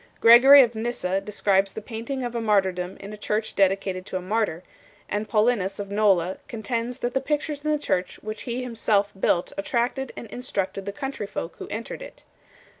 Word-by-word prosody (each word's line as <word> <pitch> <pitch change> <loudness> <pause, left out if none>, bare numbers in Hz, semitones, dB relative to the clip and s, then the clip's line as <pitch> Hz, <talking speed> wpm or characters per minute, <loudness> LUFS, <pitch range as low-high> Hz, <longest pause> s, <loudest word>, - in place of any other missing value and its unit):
Gregory 265 +4 +9
of 240 -1 -1
Nyssa 220 -5 -2
6 195 - -4
describes 195 -2 +1
the - - -5
painting 235 +4 -5
of 240 -1 -3
a 235 - -2
martyrdom 190 -4 +1
in 200 +2 -8
a - - -8
church 210 +1 -2
dedicated 195 -1 +1
to 185 - -3
a - - -3
martyr; 185 -2 -1 0.4
and 210 +1 -3
Paulinus 210 -3 +1
of 200 -1 -6
Nola 200 -5 +3
7 190 - -7
contends 235 0 -3
that 245 -1 -3
the 265 - +1
pictures 295 +1 -2
in 305 - -1
the 300 - +2
church 185 -10 -1
which 215 0 -5
he 245 +2 -2
him 245 -2 -6
self 205 -2 +2
built 175 -2 +1
attracted 245 +5 -1
and - - -6
instructed 195 -5 -3
the - - -1
country 265 -2 -5
folk 165 - -6
who - - -7
entered 230 - -6
it. - - -11
215 Hz, 200 wpm, -25 LUFS, 195-245 Hz, 0.4 s, Gregory